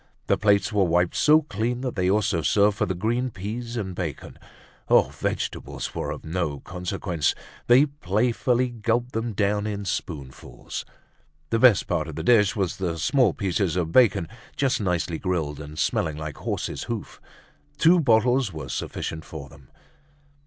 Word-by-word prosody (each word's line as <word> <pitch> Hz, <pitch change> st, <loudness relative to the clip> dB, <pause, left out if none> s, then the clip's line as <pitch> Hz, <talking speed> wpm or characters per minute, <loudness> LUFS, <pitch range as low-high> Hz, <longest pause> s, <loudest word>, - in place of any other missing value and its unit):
The -, -, +3 dB
plates 100 Hz, 0 st, +2 dB
were 100 Hz, -2 st, +3 dB
wiped 90 Hz, 0 st, +1 dB
so 155 Hz, +1 st, +5 dB
clean 120 Hz, 0 st, -2 dB
that 130 Hz, -2 st, -3 dB
they 90 Hz, -2 st, +1 dB
also 105 Hz, -3 st, +1 dB
served 100 Hz, +7 st, +3 dB
for -, -, 0 dB
the 95 Hz, -, -2 dB
green 120 Hz, +7 st, 0 dB
peas 115 Hz, +4 st, -5 dB
and 95 Hz, -4 st, -3 dB
bacon. 85 Hz, -6 st, -6 dB, 0.5 s
Oh! -, -, +5 dB
vegetables -, -, -4 dB
were -, -, -3 dB
of -, -, -6 dB
no 80 Hz, -3 st, -2 dB
consequence. 90 Hz, -3 st, -2 dB, 0.3 s
They 125 Hz, +4 st, +7 dB
playfully 125 Hz, -, 0 dB
gulped 120 Hz, +1 st, -1 dB
them 115 Hz, -1 st, -2 dB
down 105 Hz, +1 st, 0 dB
in 100 Hz, -1 st, -4 dB
spoonfuls. 70 Hz, -8 st, -6 dB, 0.7 s
The 115 Hz, -, +2 dB
best 120 Hz, -5 st, +6 dB
part 80 Hz, -1 st, -1 dB
of 80 Hz, -, -7 dB
the -, -, -4 dB
dish 110 Hz, -5 st, +4 dB
was 95 Hz, -5 st, -1 dB
the 85 Hz, -3 st, -2 dB
small 110 Hz, -, +2 dB
pieces 95 Hz, -2 st, 0 dB
of 85 Hz, -3 st, -1 dB
bacon 105 Hz, -9 st, +4 dB, 0.3 s
just 135 Hz, -4 st, +1 dB
nicely 90 Hz, -3 st, -1 dB
grilled 80 Hz, -6 st, -2 dB
and 75 Hz, +1 st, -9 dB
smelling 80 Hz, -2 st, 0 dB
like 75 Hz, -2 st, -6 dB
horse's -, -, -3 dB
hoof. -, -, -6 dB, 0.6 s
Two 175 Hz, +2 st, +5 dB
bottles 125 Hz, -, +3 dB
were 80 Hz, -2 st, -7 dB
sufficient 80 Hz, 0 st, -4 dB
for 75 Hz, -5 st, -9 dB
them. 65 Hz, -3 st, -17 dB
100 Hz, 160 wpm, -25 LUFS, 85-120 Hz, 0.7 s, They